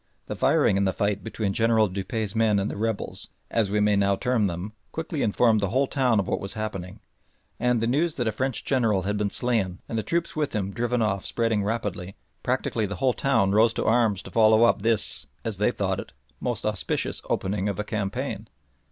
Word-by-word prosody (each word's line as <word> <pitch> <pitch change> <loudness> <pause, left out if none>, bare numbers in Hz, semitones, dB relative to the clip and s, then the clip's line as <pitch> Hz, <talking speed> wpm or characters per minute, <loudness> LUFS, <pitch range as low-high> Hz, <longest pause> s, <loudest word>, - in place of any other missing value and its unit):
The - - -5
firing 95 - +3
in 100 - +2
the 95 - +1
fight 100 -1 -1
between 100 -1 -2
General 110 0 +3
Dupuy's 100 +3 -3
men 110 -2 +3
and 100 +1 -1
the - - -6
rebels, 110 0 -3 0.2
as 110 -4 +1
we 105 +1 +1
may 105 0 +3
now 100 0 +3
term 120 -1 +1
them, 90 +4 -5 0.2
quickly 160 -2 -3
informed 110 +1 +3
the 100 - 0
whole 130 +6 +2
town 130 -5 +2
of 95 - -1
what - - -1
was 100 - -6
happening, 105 -2 -5 0.6
and, 125 -1 +2
the - - +1
news 150 +7 +1
that 120 - -1
a - - +2
French 130 +2 -2
General 115 -8 +2
had 105 +3 -1
been 105 -1 0
slain 110 -7 0
and 115 - -2
the - - 0
troops 170 +7 -2
with 150 -6 -1
him 100 -2 -1
driven 120 +1 0
off 100 -3 0
spreading 115 -3 0
rapidly, 100 -4 -3 0.3
practically 110 -3 -1
the 100 - -5
whole 125 +7 +1
town 115 -9 +2
rose 110 +2 +4
to - - -1
arms 110 -4 +2
to - - -10
follow 110 0 +5
up 115 -3 +4
this, 115 0 +1 0.2
as - - -2
they - - +3
thought - - -1
it, 65 - -8 0.3
most 120 -2 -2
auspicious 100 -7 -1
opening 100 +1 -1
of 100 - -3
a - - 0
campaign. 105 -2 -3
110 Hz, 215 wpm, -25 LUFS, 100-115 Hz, 0.6 s, follow